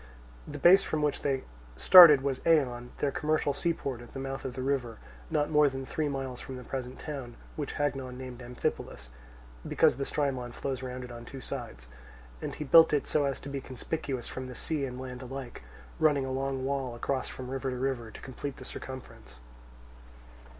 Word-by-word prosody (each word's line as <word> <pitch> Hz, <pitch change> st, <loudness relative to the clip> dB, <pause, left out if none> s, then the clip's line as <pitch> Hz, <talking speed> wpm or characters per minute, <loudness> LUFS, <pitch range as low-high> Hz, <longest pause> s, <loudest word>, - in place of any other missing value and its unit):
The -, -, -6 dB
base 190 Hz, +3 st, +7 dB
from 155 Hz, -5 st, -2 dB
which 150 Hz, -, 0 dB
they 135 Hz, -2 st, 0 dB, 0.3 s
started 155 Hz, -, +10 dB
was 135 Hz, -1 st, -1 dB
Eion, 125 Hz, -7 st, +2 dB
their 145 Hz, -, 0 dB
commercial 150 Hz, 0 st, 0 dB
seaport 140 Hz, -5 st, -2 dB
at 120 Hz, -, -13 dB
the 135 Hz, -, -5 dB
mouth 135 Hz, 0 st, -5 dB
of 130 Hz, -1 st, -4 dB
the 130 Hz, -, -3 dB
river, 130 Hz, -4 st, -1 dB, 0.3 s
not 150 Hz, +1 st, 0 dB
more 150 Hz, -1 st, +5 dB
than 135 Hz, 0 st, -5 dB
three 150 Hz, +2 st, -1 dB
miles 135 Hz, -3 st, -4 dB
from 130 Hz, -, -7 dB
the 125 Hz, -, -8 dB
present 130 Hz, 0 st, -5 dB
town, 135 Hz, -6 st, -6 dB, 0.2 s
which 145 Hz, -3 st, -4 dB
Hagnon 135 Hz, -3 st, -2 dB
named 130 Hz, -1 st, -8 dB
Amphipolis, 120 Hz, -, -4 dB, 0.6 s
because -, -, +3 dB
the 140 Hz, -, -2 dB
Strymon 130 Hz, -5 st, -1 dB
flows 135 Hz, -1 st, -3 dB
round 125 Hz, 0 st, -5 dB
it 125 Hz, -, -8 dB
on 120 Hz, 0 st, -8 dB
two 135 Hz, +3 st, -9 dB
sides, 115 Hz, -, -7 dB, 0.5 s
and -, -, -4 dB
he -, -, -4 dB
built 160 Hz, +3 st, +7 dB
it 145 Hz, -, +2 dB
so 150 Hz, -2 st, +1 dB
as 135 Hz, -1 st, -2 dB
to 140 Hz, -, -7 dB
be 140 Hz, -1 st, -4 dB
conspicuous 130 Hz, -1 st, -4 dB
from 130 Hz, 0 st, -6 dB
the 125 Hz, -, -8 dB
sea 150 Hz, +2 st, -2 dB
and 125 Hz, -1 st, -6 dB
land 130 Hz, -1 st, -7 dB
alike, 130 Hz, -1 st, -7 dB, 0.4 s
running 145 Hz, -4 st, +3 dB
a 130 Hz, -, -4 dB
long 135 Hz, 0 st, -2 dB
wall 135 Hz, -3 st, -2 dB
across 130 Hz, +2 st, -2 dB
from 130 Hz, 0 st, -7 dB
river 135 Hz, 0 st, -2 dB
to 125 Hz, -, -3 dB
river, 125 Hz, -3 st, -2 dB
to -, -, -11 dB
complete 135 Hz, +1 st, -6 dB
the -, -, -10 dB
circumference. 130 Hz, -, -9 dB
135 Hz, 195 wpm, -30 LUFS, 125-140 Hz, 0.6 s, started